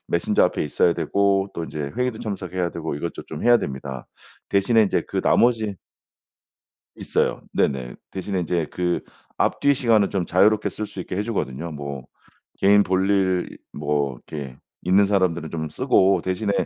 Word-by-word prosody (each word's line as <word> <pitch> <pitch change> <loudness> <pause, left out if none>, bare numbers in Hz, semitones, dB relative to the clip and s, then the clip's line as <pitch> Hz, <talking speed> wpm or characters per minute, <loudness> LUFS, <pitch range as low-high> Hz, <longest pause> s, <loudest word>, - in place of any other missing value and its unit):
메신저 - - +2
앞에 - - 0
있어야 85 +3 +2
되고 100 +4 +1
또 85 - -3
인제 75 - -6 0.2
회의도 125 -2 -1
참석해야 95 -4 -3
되고 80 -2 -4
이것도 85 +4 -5
좀 - - -7
해야 120 0 +6
됩니다. 65 - -6 0.4
대신에 110 +3 +3
인제 100 - 0
그 - - -1
나머지 110 -4 +3 1.2
있어요. - - -1
네네. 65 -3 0 0.2
대신에 95 0 -3
인제 85 -2 -1
그 90 -1 -1 0.4
앞뒤 140 - +2
시간은 115 -7 +3
좀 95 -3 -1
자유롭게 105 +5 +3
쓸 110 - -5
수 - - -9
있게 90 - -5
해 100 - 0
주거든요. 85 - -3
뭐 70 -3 -6 0.5
개인 100 +1 +5
볼일 95 -1 +1 0.2
뭐 75 -2 -1
이렇게 70 +1 -8 0.3
있는 95 +3 +4
사람들은 90 -5 +1
좀 80 -1 -4
쓰고 95 +5 +3
대신에 95 +3 -1
95 Hz, 330 characters per minute, -23 LUFS, 80-100 Hz, 1.2 s, 해야